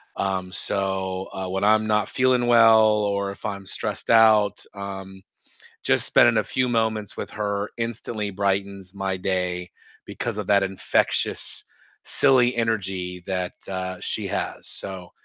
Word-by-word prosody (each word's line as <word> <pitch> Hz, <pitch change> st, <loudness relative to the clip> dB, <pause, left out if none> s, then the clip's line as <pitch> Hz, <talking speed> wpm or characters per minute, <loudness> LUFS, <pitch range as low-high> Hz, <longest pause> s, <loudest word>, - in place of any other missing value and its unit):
um, 95 Hz, -1 st, -2 dB
so, 95 Hz, 0 st, -2 dB
uh, 95 Hz, 0 st, -4 dB
when 95 Hz, +1 st, -2 dB
I'm 110 Hz, +1 st, +4 dB
not 105 Hz, -1 st, +1 dB
feeling 125 Hz, -1 st, +2 dB
well 115 Hz, -2 st, +7 dB
or 100 Hz, -2 st, +1 dB
if 100 Hz, -, -11 dB
I'm 100 Hz, -1 st, -4 dB
stressed -, -, -4 dB
out, 110 Hz, -3 st, +5 dB
um, 95 Hz, -1 st, -7 dB, 0.6 s
just -, -, +2 dB
spending -, -, +5 dB
a -, -, +1 dB
few 130 Hz, -1 st, 0 dB
moments 110 Hz, -3 st, -1 dB
with -, -, -4 dB
her 100 Hz, -1 st, -2 dB
instantly 115 Hz, -2 st, -3 dB
brightens 100 Hz, -1 st, -2 dB
my 95 Hz, -1 st, -2 dB
day 90 Hz, -1 st, -1 dB, 0.4 s
because -, -, -4 dB
of -, -, -3 dB
that 100 Hz, -1 st, +4 dB
infectious, 95 Hz, -1 st, 0 dB, 0.4 s
silly 125 Hz, -3 st, +3 dB
energy 95 Hz, -6 st, -2 dB
that, 90 Hz, -1 st, -2 dB, 0.2 s
uh, 95 Hz, -1 st, -4 dB
she -, -, -2 dB
has, -, -, -3 dB
so, 95 Hz, -2 st, -6 dB
100 Hz, 140 wpm, -24 LUFS, 95-110 Hz, 0.6 s, well